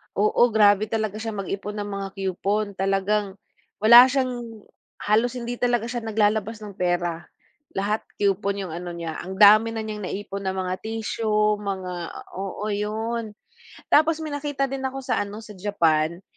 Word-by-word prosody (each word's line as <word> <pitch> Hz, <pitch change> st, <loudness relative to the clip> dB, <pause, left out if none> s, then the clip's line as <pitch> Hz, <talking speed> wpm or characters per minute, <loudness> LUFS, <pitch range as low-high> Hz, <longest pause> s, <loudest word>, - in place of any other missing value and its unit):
oo, 210 Hz, +2 st, +2 dB
grabe 205 Hz, 0 st, +5 dB
talaga 215 Hz, -1 st, -2 dB
siyang 220 Hz, -3 st, -4 dB
mag-ipon 200 Hz, +2 st, -5 dB
ng 205 Hz, -1 st, -4 dB
mga 195 Hz, 0 st, -3 dB
coupon, 200 Hz, +2 st, -1 dB
talagang 195 Hz, +1 st, 0 dB, 0.5 s
wala 240 Hz, +3 st, +10 dB
siyang, 245 Hz, -5 st, -3 dB, 0.4 s
halos 230 Hz, +4 st, +2 dB
hindi 240 Hz, 0 st, -5 dB
talaga 240 Hz, -2 st, +1 dB
siya 240 Hz, +1 st, -3 dB
naglalabas 220 Hz, -1 st, 0 dB
ng 205 Hz, -2 st, -10 dB
pera, 175 Hz, -1 st, -1 dB, 0.5 s
lahat 205 Hz, +3 st, -1 dB
coupon 200 Hz, 0 st, 0 dB
yung 180 Hz, -, -6 dB
ano 175 Hz, +1 st, -6 dB
niya, 165 Hz, -2 st, -5 dB
ang 190 Hz, +1 st, -6 dB
dami 215 Hz, +3 st, +6 dB
na 220 Hz, -, -3 dB
niyang 215 Hz, -1 st, -5 dB
naipon 200 Hz, 0 st, -5 dB
na 190 Hz, -, -1 dB
mga 185 Hz, 0 st, -2 dB
tissue, 215 Hz, -1 st, 0 dB
mga 190 Hz, -3 st, -4 dB, 0.5 s
oo, 195 Hz, +2 st, -4 dB
'yon. 215 Hz, +2 st, -3 dB, 0.6 s
Tapos 315 Hz, +1 st, +4 dB
may 310 Hz, -, -4 dB
nakita 290 Hz, -2 st, -2 dB
din 270 Hz, -1 st, -3 dB
ako 270 Hz, +1 st, -5 dB
sa -, -, 0 dB
ano, 205 Hz, +2 st, -4 dB
sa 215 Hz, -, -13 dB
Japan, 170 Hz, -4 st, +1 dB
210 Hz, 160 wpm, -24 LUFS, 195-225 Hz, 0.6 s, wala